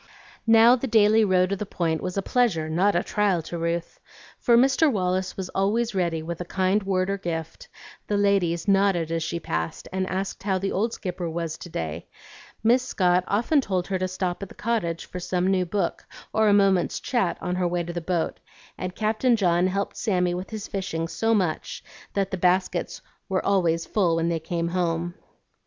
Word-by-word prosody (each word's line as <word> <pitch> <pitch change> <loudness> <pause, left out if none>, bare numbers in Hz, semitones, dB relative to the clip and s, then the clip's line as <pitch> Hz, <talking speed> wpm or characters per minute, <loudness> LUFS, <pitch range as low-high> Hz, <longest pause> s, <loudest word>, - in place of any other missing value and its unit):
Now 230 +2 +7
the 260 +1 -3
daily 220 -1 +5
row 185 -3 +3
to 195 +2 -2
the 200 - -4
Point 165 -3 -1
was 185 +1 -4
a 195 - 0
pleasure, 205 -12 +1
not 180 +6 +2
a 175 - +2
trial, 200 -5 +1
to 170 +2 -6
Ruth, 170 0 -3 0.4
for 235 -2 +4
Mr. 270 +4 +4
Wallace 185 -3 -1
was 190 -1 -4
always 220 +4 0
ready 170 -4 -1
with 170 +1 -5
a - - -1
kind 190 +3 +1
word 185 -1 0
or 200 - -2
gift, 170 - -5 0.4
the 205 - 0
ladies 195 -4 +1
nodded 195 -4 +2
as 165 0 -1
she 170 +1 -2
passed, 80 - -4
and 190 0 -1
asked 190 +1 -3
how 195 -1 0
the 195 +1 -2
old 220 +5 0
Skipper 180 -3 -4
was 165 -1 -3
to 175 - -9
day; 80 - -5 0.6
Miss 240 +3 +4
Scott 180 -7 +2
often 240 +8 +2
told 185 -6 -1
her 190 -1 -1
to 185 - 0
stop 185 0 -3
at 200 - -6
the - - -14
cottage 210 -8 -2
for 180 - -7
some 180 0 -1
new 185 -1 +1
book 190 -1 -2 0.3
or 220 0 +3
a - - +5
moment's 195 -3 +3
chat 235 -9 0
on 180 - -3
her 180 -1 +1
way 175 0 -1
to 170 +1 -6
the 175 - -3
boat, 170 0 -2 0.4
and 185 0 -4
Captain 225 +3 +2
John 180 -4 +2
helped 200 +2 -2
Sammy 180 -5 +1
with 180 +2 -5
his 215 -2 -6
fishing 185 -4 -3
so 225 +6 +1
much 180 -6 -2 0.3
that 195 -1 0
the 190 - -2
baskets 185 +1 0 0.3
were 190 -1 0
always 170 -4 +2
full 180 -6 +1
when 165 0 0
they 165 -1 0
came 170 +1 -2
home. 175 -1 -1
185 Hz, 200 wpm, -25 LUFS, 170-205 Hz, 0.6 s, Now